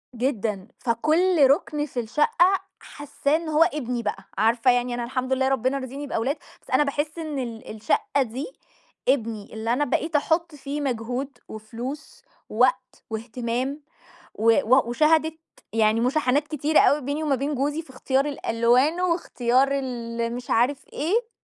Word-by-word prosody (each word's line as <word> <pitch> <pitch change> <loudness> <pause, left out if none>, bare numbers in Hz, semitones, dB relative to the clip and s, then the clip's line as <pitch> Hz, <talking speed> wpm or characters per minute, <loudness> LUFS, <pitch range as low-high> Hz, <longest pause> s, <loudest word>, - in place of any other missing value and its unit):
جدًا، 220 -6 -2
فكلّ 310 +6 +3
رُكن 295 0 +1
في 255 -4 -5
الشقة 340 - +2 0.2
حاسّاه 290 0 -2
إن 325 0 -2
هو 310 +1 +5
ابني 250 -7 -2
بقى، 210 - -3
عارفة 230 +4 +3
يعني 245 0 0
أنا 240 0 -2
الحمد 255 +2 -2
لله 265 0 +1
ربنا 265 0 +1
رازقني 275 +2 -6
بأولاد، 270 +5 -1 0.2
بس - - -22
أنا - - +4
باحس 290 +2 -2
إن 310 -4 -4
ال 230 -3 -6
الشقة 225 +5 0
دي 255 +2 -3 0.6
ابني، 230 -6 0
اللي 220 +1 -1
أنا 290 +4 +1
بقيت 315 +5 -1
أحُط 320 +2 +1
فيه 285 +1 -5
مجهود 255 +1 -3
وفلوس 235 +7 -7 0.3
ووقت - - +1
وإهتمام 240 +5 -3 0.5
و 225 +2 +4
و 255 0 +3
وشهَدِت 315 +4 +2 0.3
يعني 220 0 +3
مشاحنات 275 +3 +1
كتيرة 305 0 +2
أوي 295 +1 +4
بيني 285 +4 -3
وما 290 -3 +2
بين 280 +3 -2
جوزي 290 +4 -1
في 315 - -21
إختيار 265 +1 0
الألوان 265 +3 +2
واختيار 270 -8 +2
ال 235 -3 -3
مش 245 0 -8
عارف 255 +4 +1
إيه. 435 - 0
265 Hz, 150 wpm, -24 LUFS, 235-295 Hz, 0.6 s, هو